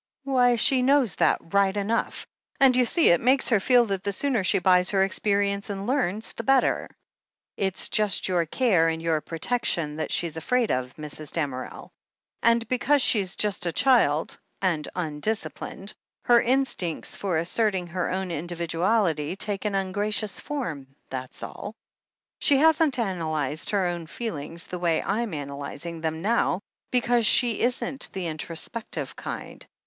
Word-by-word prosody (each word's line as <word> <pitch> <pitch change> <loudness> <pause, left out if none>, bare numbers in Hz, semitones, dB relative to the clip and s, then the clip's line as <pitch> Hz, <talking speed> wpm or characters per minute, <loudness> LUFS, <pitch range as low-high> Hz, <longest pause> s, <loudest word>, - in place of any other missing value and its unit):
"Why, 250 -3 +3
she 255 +3 +3
knows 260 - +3
that 165 - +1
right 200 0 +3
enough. 210 +3 -1 0.3
And, 265 -2 +5
you 250 -1 +4
see, 330 +7 +3
it 170 - +4
makes 260 +1 +3
her 225 -5 +4
feel 245 +4 +4
that 195 -3 -2
the 200 - -2
sooner 245 0 0
she 185 - +2
buys 180 -1 +3
her 195 -1 +3
experience 200 +1 0
and 200 -1 -4
learns, 225 -5 -1
the 230 - -6
better. 270 +2 +2 0.7
It's 190 -2 -1
just 210 -2 +2
your 175 -3 +1
care 180 -6 +2
and 160 0 -2
your 165 -2 0
protection 165 -4 -1
that's 160 - -3
she - - +1
afraid 170 +10 0
of, 125 0 -2
Mrs. 150 -1 -7
Damerel. 140 -6 -4 0.5
And 230 +1 +3
because 270 +2 +2
she's 195 -5 +2
just 200 -4 0
a - - 0
child, 195 - +2 0.2
and 170 -6 -1
tmdisciplined, 185 +4 -4 0.3
her 240 -1 +5
in 265 +3 +2
stincts 175 -10 -3
for 185 -5 -1
asserting 190 +2 0
her 175 +1 -3
own 190 -1 -3
individuality 170 0 -1
take 200 0 -3
an 210 - 0
tm 195 -1 -1
gracious 210 0 -1
form, 150 - -5 0.2
that's 130 -1 -5
all. 210 - -7 0.6
She 285 - +4
hasn*t 310 -2 +3
analyzed 160 - -1
her 200 -3 +1
own 175 -2 -3
feelings 165 -5 -5
the 180 - -6
way 170 -2 +1
I'm 210 -2 -2
analyzing 145 +3 -6
them 160 0 -3
now, 210 -3 +1 0.3
because 240 -2 +2
she 240 -4 +4
isn't 255 +2 -1
the 190 -2 -4
introspective 165 +7 -5
kind. - - -7
195 Hz, 155 wpm, -25 LUFS, 165-235 Hz, 0.7 s, And